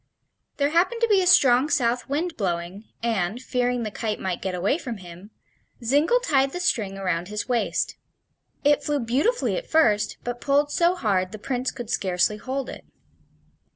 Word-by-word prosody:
There 285 0 +1
happened 365 +8 +2
to 465 - +4
be 405 -3 +4
a 365 - 0
strong 265 -4 +5
south 245 -3 0
wind 315 +4 -1
blowing 180 +1 -3 0.2
and, 220 -2 -1
fearing 245 -1 -1
the 215 - -4
kite 215 0 -3
might 185 -2 -3
get 190 -1 -3
away 195 - 0
from 245 -8 -5
him, 180 +1 -12 0.5
Zingle 295 - +3
tied 275 - +2
the 355 - -4
string 210 - 0
around 180 -3 -2
his 210 +2 -4
waist. 245 -2 -1 0.7
It 290 0 +3
flew 295 -1 0
beautifully 275 - 0
at - - -6
first, 220 -10 +2
but 245 0 -5
pulled 290 +1 +2
so 345 +1 +2
hard 190 - 0
the 215 - -7
Prince 250 +4 -2
could 240 -2 -7
scarcely 185 +2 +1
hold 265 +4 -4
it. - - -9
245 Hz, 175 wpm, -24 LUFS, 205-290 Hz, 0.7 s, strong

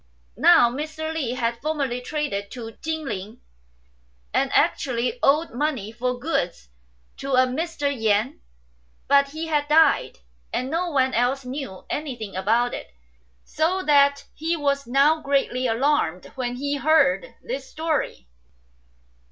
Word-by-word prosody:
2 - - -14
Now 240 -1 +7
Mr. 315 +4 -4
Li 275 -7 -2
had 235 -1 -2
formerly 280 -5 -2
traded 250 -8 -3
to 230 -1 -7
Chin 315 -1 -3
ling, 210 0 -6 0.9
and - - +1
actually 250 - +1
owed 305 +4 +3
money 250 -5 -2
for 250 +2 -2
goods 180 - -2 0.5
to 275 0 -4
a 255 0 +5
Mr. 295 +3 -2
Yen; 220 0 0 0.7
but 280 0 +4
he 315 +3 -5
had 300 -2 0
died, 300 - +4 0.3
and 255 +2 -2
no 345 +2 0
one 265 -4 +1
else 255 +3 +1
knew 255 -7 -6
anything 245 -10 -5
about 225 +6 +1
it, - - -6 0.5
so 365 - 0
that 280 -2 +4
he 325 +2 -1
was 280 -3 0
now 285 +5 +3
greatly 270 -3 0
alarmed 230 - 0
when 245 -2 -3
he 285 +3 -2
heard 310 - +2
this - - -5
story. 315 - -2
275 Hz, 135 wpm, -24 LUFS, 240-305 Hz, 0.9 s, Now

